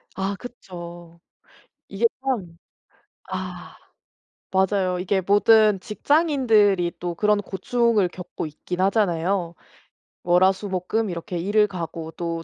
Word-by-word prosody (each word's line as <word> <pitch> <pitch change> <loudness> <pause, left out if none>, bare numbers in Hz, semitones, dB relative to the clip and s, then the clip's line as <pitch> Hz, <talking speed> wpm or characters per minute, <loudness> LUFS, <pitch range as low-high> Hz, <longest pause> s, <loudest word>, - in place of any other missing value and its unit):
아 195 +1 -2
그쵸. 175 -8 -10 0.7
이게 - - -1 0.2
참 210 -11 -3 0.7
아. - - -6 0.8
맞아요. 190 -1 +1
이게 190 +1 +1
모든 205 +1 +4
직장인들이 220 - +2
또 175 -1 -3
그런 210 +3 +2
고충을 215 +1 +1
겪고 180 -2 -7
있긴 175 +4 -6
하잖아요. 185 -3 +1 0.7
월, 175 +1 +4
화, 190 - +6
수, 200 +1 -7
목, 185 -1 -3
금 220 -1 0
이렇게 175 0 -5
일을 210 +4 +2
가고 165 -4 -6
또 165 -1 -4
190 Hz, 220 characters per minute, -23 LUFS, 175-210 Hz, 0.8 s, 화